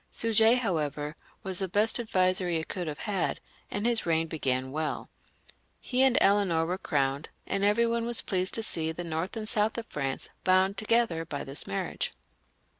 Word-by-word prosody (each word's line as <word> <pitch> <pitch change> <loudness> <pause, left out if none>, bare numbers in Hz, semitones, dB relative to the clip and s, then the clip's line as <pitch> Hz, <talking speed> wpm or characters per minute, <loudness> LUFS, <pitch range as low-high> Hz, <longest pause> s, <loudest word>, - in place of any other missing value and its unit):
Suger, 225 +1 +4
however, 155 - -2 0.3
was 190 -3 +1
the 190 - +1
best 210 +6 +2
adviser 185 -5 +1
he 165 -2 0
could 175 +1 -4
have 150 -1 -4
had, 195 -4 -1 0.3
and 205 +2 -2
his 235 -1 +2
reign 165 -1 +1
began 130 -5 -2
welL 155 +2 -3 0.7
He 255 0 -1
and 265 -2 +5
Eleanor 195 -5 +3
were 180 +3 -2
crowned, 140 -2 -1 0.2
and 195 - -1
every 210 +3 +4
one 230 0 0
was 240 -1 0
pleased 185 -1 0
to 225 - 0
see 160 -6 +2
the 175 +2 -5
north 165 +5 -3
and 215 -1 -4
south 215 +1 +1
of 230 - -4
France 135 -7 -4 0.2
bound 185 +2 +3
together 220 -6 +1
by 150 -3 -5
this 135 +1 -6
marriage. 100 - -2
185 Hz, 180 wpm, -28 LUFS, 160-220 Hz, 0.7 s, and